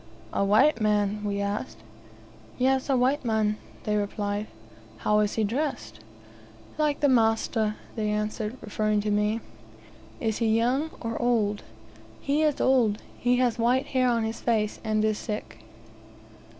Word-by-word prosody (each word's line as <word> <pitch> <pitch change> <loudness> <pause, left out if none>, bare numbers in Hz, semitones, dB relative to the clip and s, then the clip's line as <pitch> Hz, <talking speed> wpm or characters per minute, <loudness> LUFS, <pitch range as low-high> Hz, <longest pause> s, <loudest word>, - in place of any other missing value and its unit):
"A - - +1
white 215 +7 +4
man?" 210 -1 +1
we 200 -1 -1
asked. 200 +1 -3 0.8
"Yes, 265 +2 +1
a 270 - +3
white 265 +4 +2
man," 215 -2 +1 0.3
they 210 - 0
replied. 205 0 -2 0.5
"How 210 0 +2
is 210 -1 +1
he 220 - +1
dressed?" 210 - -2 0.8
"Like 300 -1 +1
the 290 - +5
master," 225 -3 +2 0.2
they 215 -1 -1
answered, 210 +2 -2
referring 215 0 0
to 210 0 -1
me. 210 +2 +1 0.8
"Is 220 -1 -1
he 225 -1 +2
young, 260 +7 +1
or 230 -1 -3
old?" 220 -4 +1 0.6
"He 290 +2 0
is 305 -2 +1
old. 240 -6 +3 0.2
He 245 +1 +2
has 245 -2 +1
white 245 +3 +2
hair 255 -1 +3
on 230 -2 +1
his 225 +1 -3
face, 215 -3 0
and 215 -1 +1
is 215 -1 0
sick." 210 - -5
220 Hz, 150 wpm, -26 LUFS, 210-250 Hz, 0.8 s, the